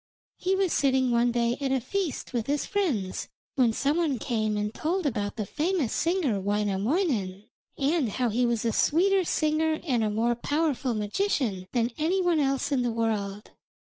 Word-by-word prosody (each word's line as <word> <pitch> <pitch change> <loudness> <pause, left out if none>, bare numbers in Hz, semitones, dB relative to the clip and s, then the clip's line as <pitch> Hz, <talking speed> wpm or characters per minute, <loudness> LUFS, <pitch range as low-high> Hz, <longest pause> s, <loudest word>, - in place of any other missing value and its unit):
He 375 +1 0
was 385 -3 +1
sitting 265 -2 +2
one 240 +1 +3
day 235 0 +1
at 270 -1 0
a 265 - +2
feast 320 - -3
with 235 -2 -1
his 290 +1 0
friends, 275 - -1 0.3
when 250 -4 +3
some 280 +7 0
one 315 -6 +1
came 215 -2 -1
and 210 +1 -2
told 345 +6 -1
about 210 -7 -1
the 215 -3 -3
famous 315 - -1
singer 325 - +1
Wainamoinen, 205 - 0 0.3
and 285 -2 +1
how 245 +3 0
he 235 +3 +1
was 235 -2 0
a 230 - +2
sweeter 380 - +3
singer 315 -1 +1
and 245 -7 +1
a 215 - +1
more 225 +3 +1
powerful 280 -1 -1
magician 210 - -1
than 240 -1 +1
any 340 +5 +1
one 350 -3 +2
else 275 0 0
in 270 -3 +2
the 245 - 0
world. 210 -3 -2
255 Hz, 175 wpm, -27 LUFS, 220-315 Hz, 0.3 s, one